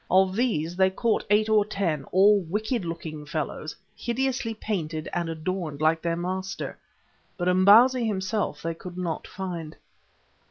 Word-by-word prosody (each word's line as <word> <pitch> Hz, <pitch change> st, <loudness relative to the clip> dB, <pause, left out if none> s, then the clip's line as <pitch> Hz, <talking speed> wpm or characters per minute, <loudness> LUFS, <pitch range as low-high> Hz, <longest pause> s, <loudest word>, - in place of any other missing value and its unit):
Of 190 Hz, +1 st, +4 dB
these 175 Hz, -9 st, 0 dB
they 190 Hz, 0 st, +4 dB
caught 220 Hz, +4 st, 0 dB
eight 210 Hz, +1 st, +4 dB
or 215 Hz, -1 st, +4 dB
ten, 175 Hz, -9 st, -2 dB
all 200 Hz, +3 st, +5 dB
wicked 210 Hz, +6 st, -2 dB
looking 165 Hz, -3 st, -6 dB
fellows 155 Hz, 0 st, -4 dB, 0.2 s
hideously 240 Hz, 0 st, -1 dB
painted 165 Hz, -8 st, -3 dB
and 170 Hz, -1 st, -1 dB
adorned 160 Hz, -2 st, -3 dB
like 160 Hz, +1 st, +2 dB
their 170 Hz, -1 st, 0 dB
master, 185 Hz, +2 st, -4 dB, 0.6 s
but 175 Hz, -, -2 dB
Imbozwi 215 Hz, +8 st, +6 dB
himself 190 Hz, -6 st, -2 dB
they 165 Hz, 0 st, -1 dB
could 180 Hz, +2 st, -10 dB
not 175 Hz, -3 st, -3 dB
find. 175 Hz, -5 st, -6 dB
185 Hz, 145 wpm, -26 LUFS, 165-210 Hz, 0.6 s, Imbozwi